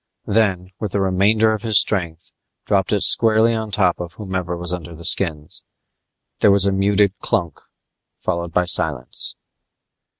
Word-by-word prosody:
Then, 95 -4 0
with 105 -3 -5
the 100 - 0
remainder 100 +4 +2
of 110 - -4
his 110 -3 +3
strength, 85 -5 -1 0.3
dropped - - 0
it - - +1
squarely 115 +1 +3
on 110 -1 -4
top 95 -3 +1
of 85 0 -7
whomever 95 -4 -5
was 90 +1 +1
under 85 -2 -7
the 85 +1 -9
skins. 80 -5 +2 0.8
There - - +4
was 100 -1 +3
a 100 - +1
muted 100 0 +1
clunk 85 - -1 0.6
followed 85 0 -4
by 90 - +1
silence. 80 -4 -1
95 Hz, 155 wpm, -19 LUFS, 85-105 Hz, 0.8 s, There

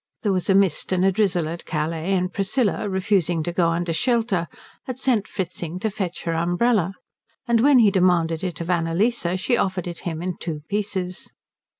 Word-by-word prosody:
There 205 -3 +2
was 185 0 -2
a 195 - +5
mist 195 -4 +2
and 185 0 +2
a 195 - +4
drizzle 185 -5 +1
at 170 +2 -6
Calais, 160 +3 -2
and 180 -1 0
Priscilla, 205 +1 0
refusing 185 -4 +1
to 175 - -3
go 170 -1 +2
under 170 0 -1
shelter, 225 -4 +1 0.4
had 255 -2 -4
sent 250 -6 +1
Fritzing 175 -3 -4
to 215 +3 -2
fetch 190 -3 -4
her 165 - -1
umbrella, 175 +3 +1 0.5
and 235 -1 +3
when 280 +1 +6
he 220 -4 +6
demanded 175 -4 +2
it 175 -4 -3
of 170 +2 -2
Annalise, 175 +6 +1
she 240 +6 +1
offered 190 -5 -1
it 175 -2 -6
him 165 -1 -4
in 180 -1 -3
two 155 -3 -5
pieces. 195 -3 -3
185 Hz, 190 wpm, -23 LUFS, 170-205 Hz, 0.5 s, when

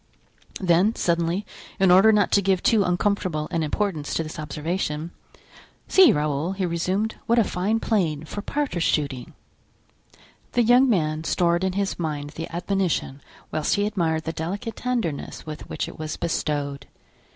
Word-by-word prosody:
Then 185 +4 +3
suddenly, 170 +3 0 0.3
in 190 -2 +5
order 195 +5 +7
not 210 -1 +2
to 200 - +4
give 190 -1 +1
too 220 -3 +4
uncomfortable 180 -4 0
an 165 - 0
importance 155 -1 -2
to 165 - 0
this 155 +1 -8
observation: 155 +1 -3 0.8
"See, 380 -3 +7
Raoul!" 150 +3 -1
he 190 -1 -1
resumed; 185 +6 -1
"what 235 - +3
a 230 - +6
fine 200 +4 -1
plain 160 -11 0
for 205 - -6
partridge 280 -6 -2
shooting." 140 -6 -1 1.2
The 240 - +3
young 250 +3 +5
man 155 -7 +1
stored 170 +1 +1
in 190 -1 0
his 195 -1 -2
mind 145 -3 -3
the 165 +2 -6
admonition 175 -5 -1 0.3
whilst 155 -1 0
he 205 - +1
admired 165 -6 0
the 160 - -4
delicate 200 +9 -4
tenderness 235 - -3
with 155 -1 -8
which - - -3
it - - -11
was 155 -1 -4
bestowed. 145 -4 -2
175 Hz, 155 wpm, -24 LUFS, 155-200 Hz, 1.2 s, order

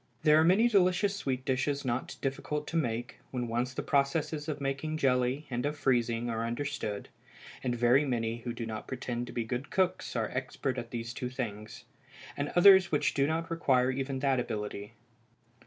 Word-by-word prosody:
There 155 0 +6
are - - +5
many 190 +8 +5
delicious 195 -1 +3
sweet 130 -8 -3
dishes 140 +2 0
not 125 0 -2
difficult 150 +2 -2
to - - -6
make 120 -6 -2
when 125 -2 -3
once 120 +2 -1
the - - -4
processes 150 +2 0
of 150 -2 -3
making 140 +3 -2
jelly 130 0 +1
and 120 0 -1
of 150 +1 -2
freezing 120 -4 +1
are 115 -1 -2
understood 120 -4 -3 0.5
(and 125 -1 0
very 120 +4 +4
many 115 -4 -1
who 120 +1 -4
do 115 0 -5
not 110 -1 -6
pretend 120 -2 -4
to - - -7
be 120 - -1
good 125 +5 -4
cooks 190 -9 0
are 115 -2 -1
expert 130 0 -2
at 115 - -7
these 115 0 -5
two 125 +1 -4
things), 110 -2 -6 0.5
and 145 0 -2
others 190 0 +7
which 150 - +2
do 140 0 +2
not 165 +2 -2
require 130 -6 +2
even 135 +1 -2
that 135 -2 +2
ability. 105 -2 -4
130 Hz, 185 wpm, -30 LUFS, 120-150 Hz, 0.5 s, others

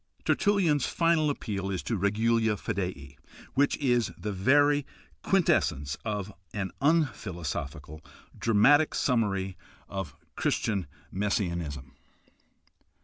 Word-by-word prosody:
Ter - - +4
tullian's 185 -9 +2
final 165 -3 +2
appeal 100 -8 -3
is 90 -5 -3
to 115 - -1
regula 110 +2 +2
fidei, 75 -9 -4 0.4
which 140 +2 +2
is 120 -5 +1
the 105 - -4
very 145 +9 +3 0.4
quintes - - +3
sence 70 +2 -4
of 105 -2 -3 0.2
an 95 -2 -2
unphilosophical, 85 - -1 0.3
dramatic 125 +8 +4
summary 100 -7 0 0.3
of 95 -8 -5 0.2
Christian 100 -7 0 0.2
messianism. 85 -9 -2
105 Hz, 100 wpm, -28 LUFS, 90-135 Hz, 0.4 s, Ter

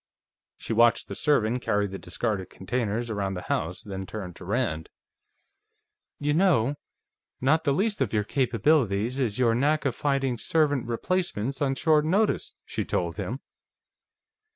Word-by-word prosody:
She - - -4
watched 115 +1 +4
the - - -4
servant 125 -5 +1
carry 105 0 +1
the 95 -1 -6
discarded 95 +1 -3
containers 115 +2 -2
around 100 -2 -2
the 90 - -5
house, 90 +1 -2
then 95 -2 -6
turned 95 -5 -6
to 90 - -10
Rand. 100 -7 -1 1.3
"You 145 0 +1
know, 155 - +3 0.7
not 155 +6 +2
the 140 - +3
least 205 +5 0
of 130 - +1
your 105 -2 +1
capabilities 125 -1 +1
is 115 -6 0
your 120 -3 +3
knack 145 +6 +1
of 135 - +1
finding 135 -4 0
servant 145 -1 +1
replacements 135 - -1
on 135 -1 +1
short 155 +1 +3
notice," 200 +7 +1
she - - -3
told - - -2
him. - - -4
120 Hz, 150 wpm, -26 LUFS, 105-145 Hz, 1.3 s, watched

